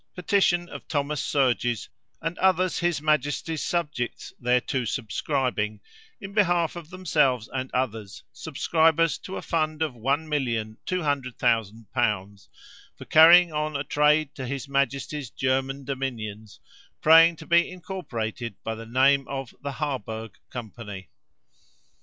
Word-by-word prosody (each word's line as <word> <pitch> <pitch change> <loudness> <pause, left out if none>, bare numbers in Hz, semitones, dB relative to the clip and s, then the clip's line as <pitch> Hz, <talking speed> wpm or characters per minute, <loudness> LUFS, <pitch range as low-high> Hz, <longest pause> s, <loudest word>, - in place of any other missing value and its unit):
Petition 180 -1 +2
of - - -10
Thomas 145 -1 -1
Surges 120 -5 +1 0.4
and 165 +1 -2
others 185 -1 +2
his 170 -4 0
majesty's 150 +1 0
subjects 150 -8 -3
thereto 125 +1 +1
subscribing, 110 -2 -2 0.4
in 200 -2 -8
behalf 175 -6 +2
of 170 -2 -9
themselves 150 - +1
and 130 0 -3
others, 110 -5 -3
subscribers 160 0 +1
to 190 - -7
a - - -6
fund 155 -1 0
of 155 -4 -2
1,200,000l. 120 - -1 0.5
for - - -10
carrying 170 +1 +7
on 150 0 -2
a 140 - -1
trade 150 0 +2
to 130 -2 -6
his 140 +1 -4
majesty's 140 0 -1
German 135 +2 -1
dominions, 115 -6 -5 0.4
praying 165 +2 +7
to 160 - -12
be 170 +1 +4
incorporated 120 - -5
by 110 - -2
the 115 0 -9
name 135 +3 +3
of 135 -3 -5
the 140 0 -4
Harburg 110 -8 -4
Company. 105 -5 -8
140 Hz, 120 wpm, -26 LUFS, 120-160 Hz, 0.5 s, carrying